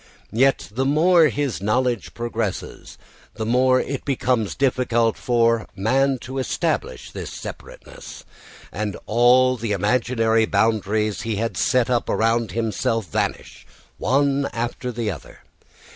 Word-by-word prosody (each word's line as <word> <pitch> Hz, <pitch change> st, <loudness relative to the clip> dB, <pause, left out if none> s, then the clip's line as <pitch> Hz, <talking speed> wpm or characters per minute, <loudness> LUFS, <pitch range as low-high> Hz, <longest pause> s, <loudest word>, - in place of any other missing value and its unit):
Yet 135 Hz, +1 st, +2 dB
the 130 Hz, +4 st, 0 dB
more 160 Hz, +4 st, +4 dB
his 145 Hz, -9 st, -2 dB
knowledge 120 Hz, +2 st, -1 dB
progresses, 115 Hz, -4 st, -4 dB, 0.4 s
the 110 Hz, -, -3 dB
more 130 Hz, +2 st, +3 dB
it 140 Hz, 0 st, -4 dB
becomes 125 Hz, -6 st, 0 dB
difficult 120 Hz, -4 st, +1 dB
for 115 Hz, -3 st, +1 dB
man 135 Hz, +7 st, +1 dB
to 130 Hz, +1 st, -5 dB
establish 65 Hz, -, -2 dB
this -, -, -7 dB
separateness, -, -, -10 dB, 0.5 s
and 105 Hz, -1 st, -3 dB
all 125 Hz, +3 st, +4 dB
the 115 Hz, -2 st, -2 dB
imaginary 115 Hz, +1 st, +1 dB
boundaries 105 Hz, 0 st, 0 dB
he 115 Hz, -1 st, -2 dB
had 115 Hz, +3 st, -2 dB
set 125 Hz, -2 st, +2 dB
up 125 Hz, -2 st, 0 dB
around 115 Hz, -2 st, +1 dB
himself 115 Hz, -4 st, -1 dB
vanish -, -, -3 dB, 0.3 s
one 140 Hz, +1 st, +1 dB
after 120 Hz, +2 st, -3 dB
another. 110 Hz, -, -5 dB
115 Hz, 120 wpm, -22 LUFS, 110-130 Hz, 0.5 s, more